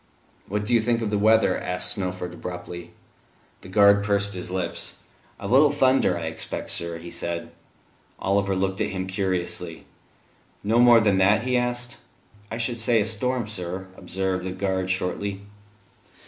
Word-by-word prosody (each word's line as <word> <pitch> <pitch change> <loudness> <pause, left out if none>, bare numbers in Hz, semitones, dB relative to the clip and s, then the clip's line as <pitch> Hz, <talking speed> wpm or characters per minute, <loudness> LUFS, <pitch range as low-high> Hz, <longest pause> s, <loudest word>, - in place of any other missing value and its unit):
"What 105 +1 -2
do 120 - -1
you 120 - +6
think 115 0 +1
of 105 - -2
the 105 - +1
weather?" 110 -2 +4
asked 90 0 -1
Snowford 90 -3 -4
abruptly. 90 -1 -7 0.7
The - - -12
guard 100 +1 +5
pursed 100 0 +1
his 90 -1 -4
lips. 90 -2 -3 0.4
"A 100 - -5
little 135 +7 +6
thunder, 130 -9 +3
I 85 - -5
expect, 80 0 -4
sir," 85 0 -2
he 85 +1 -9
said. 85 -1 -3 0.7
Oliver 100 0 +1
looked 95 0 -1
at - - +1
him 95 -1 -3
curiously. 90 -3 -2 0.8
"No 110 +3 +2
more 120 -1 +7
than 100 -3 +3
that?" 105 +4 +4
he 125 0 0
asked. 120 0 -1 0.5
"I 115 - -4
should 120 0 -1
say 115 0 +3
a 105 - +1
storm, 120 +2 -1
sir," 95 -2 -5
observed 95 0 -2
the 95 - -3
guard 95 -1 -1
shortly. 95 +2 -2
100 Hz, 160 wpm, -25 LUFS, 90-110 Hz, 0.8 s, more